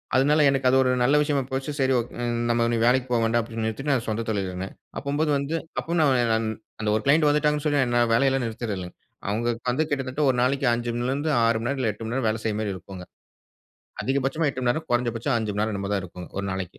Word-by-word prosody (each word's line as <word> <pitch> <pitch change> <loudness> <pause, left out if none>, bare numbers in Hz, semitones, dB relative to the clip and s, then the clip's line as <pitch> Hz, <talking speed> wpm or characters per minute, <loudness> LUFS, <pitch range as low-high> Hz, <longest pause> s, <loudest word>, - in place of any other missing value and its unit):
அதனால 145 +4 +4
எனக்கு 135 -1 +1
அது 130 - +4
ஒரு 130 - +2
நல்ல 135 +4 +4
விஷயமா 145 -2 +1
போச்சு. 135 +3 -2
"சரி 130 0 +3
ஓக் 120 - -5 0.4
நம்ம 115 0 +2
இனி 120 0 +1
வேலைக்கி 125 +1 +3
போக 120 - +3
வேண்டாம்" 115 +1 +2
அப்டீன்னு 115 -1 -4
நிறுத்திட்டு, 125 +7 -2
நான் 125 -3 0
சொந்த 110 +1 -2
தொழில்ல 100 -4 -1
இருந்தேன். 95 +1 -6 0.3
அப்பம்போது 150 +2 0
வந்து 140 +3 -2 0.2
அப்பவும் 170 +1 -1
ந - - +5 0.3
நான் 110 0 0 0.3
அந்த 105 -1 -1
ஒரு 110 - 0
க்ளையன்ட் 150 +2 +4
வந்துட்டாங்கன்னு 150 0 +1
சொல்லி 145 -1 +2
நான் 130 - +1 0.2
என் 115 - 0
வேலையெல்லாம் 135 +1 +2
நிறுத்துறதில்ல. 110 -5 -4 0.4
அவுங்க 115 +4 0 0.2
வந்து 130 +6 +1
கிட்டத்தட்ட 135 -1 -2
1 130 - +1
நாளைக்கு 135 +2 +1
5 120 0 -2
மணில 120 +2 -1
இருந்து 145 +3 -2 0.2
6 115 0 +3
மணி 115 - -3
நேரம் 140 -1 -2
இல்ல 115 -4 +1
8 105 - -10
மணி 115 - -4
நேரம் 130 -4 0
வேலை 110 +1 -1
செய்ற 105 -2 0
மாரி 105 -2 -2
இருக்குங்க. 95 0 -9 1.0
அதிகபட்சமா 135 +4 0
8 130 - -6
மணி 120 - +2
நேரம், 155 +6 -2
குறைந்தபட்சம் 120 +1 0
5 110 -2 -2
மணி 105 - -1
நேரம், 110 0 -1
என்னமோ 100 0 -3
தான் 100 - -1
இருக்கும். 90 0 -9
1 100 - -2
நாளைக்கி! 95 -2 -5
120 Hz, 235 wpm, -25 LUFS, 110-140 Hz, 1.0 s, ந